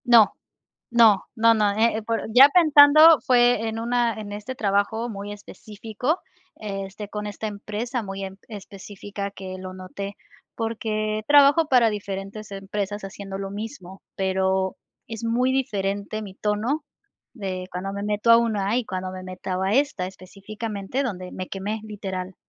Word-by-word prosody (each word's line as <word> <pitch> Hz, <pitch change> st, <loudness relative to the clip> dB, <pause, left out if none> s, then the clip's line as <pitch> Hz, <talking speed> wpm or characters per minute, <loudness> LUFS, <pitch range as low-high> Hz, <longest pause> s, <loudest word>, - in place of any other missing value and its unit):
No, 235 Hz, -4 st, +6 dB, 0.6 s
no, 225 Hz, -5 st, +5 dB
no 230 Hz, 0 st, +5 dB
no, 210 Hz, -2 st, +2 dB
eh, 225 Hz, 0 st, +2 dB
por 225 Hz, +1 st, -2 dB
ya 265 Hz, +3 st, +10 dB
pensando, 310 Hz, -1 st, +8 dB
fue 245 Hz, -4 st, +3 dB
en 225 Hz, 0 st, -4 dB
una 235 Hz, 0 st, +1 dB
en 210 Hz, -2 st, -7 dB
este 210 Hz, +5 st, -6 dB
trabajo, 215 Hz, +2 st, 0 dB
muy 205 Hz, -2 st, -6 dB
específico, 220 Hz, -, -4 dB, 0.4 s
este, 195 Hz, 0 st, -6 dB
con 210 Hz, 0 st, -5 dB
esta 210 Hz, +1 st, -5 dB
empresa, 215 Hz, +4 st, -4 dB
muy 195 Hz, -1 st, -5 dB
em, 190 Hz, 0 st, -8 dB
específica 200 Hz, -1 st, -7 dB
que 190 Hz, -1 st, -8 dB
lo 185 Hz, 0 st, -7 dB
noté, 190 Hz, +2 st, -7 dB, 0.4 s
porque, 215 Hz, -1 st, -2 dB
trabajo 290 Hz, +2 st, +6 dB
para 250 Hz, -5 st, +4 dB
diferentes 200 Hz, 0 st, -6 dB
empresas, 200 Hz, +1 st, -4 dB
haciendo 195 Hz, 0 st, -7 dB
lo 195 Hz, 0 st, -5 dB
mismo, 200 Hz, -3 st, -8 dB
pero, 190 Hz, 0 st, 0 dB, 0.3 s
es 225 Hz, 0 st, -6 dB
muy 240 Hz, +3 st, +1 dB
diferente 205 Hz, -4 st, -2 dB
mi 195 Hz, -3 st, -9 dB
tono. 215 Hz, +10 st, -1 dB, 0.5 s
De 185 Hz, -5 st, -5 dB
cuando 185 Hz, +2 st, -4 dB
me 200 Hz, -, -4 dB
meto 210 Hz, +2 st, +1 dB
a 230 Hz, -, +9 dB
una, 220 Hz, -2 st, +1 dB
y 250 Hz, -, 0 dB
cuando 185 Hz, -2 st, -4 dB
me 185 Hz, 0 st, -8 dB
meta 185 Hz, +1 st, -3 dB
a -, -, 0 dB
esta, 275 Hz, -9 st, +1 dB
específicamente 200 Hz, +5 st, -5 dB
donde 185 Hz, -8 st, -5 dB
me 185 Hz, -, -6 dB
quemé, 205 Hz, +3 st, -4 dB
literal. 190 Hz, -3 st, -6 dB
210 Hz, 150 wpm, -24 LUFS, 195-230 Hz, 0.6 s, ya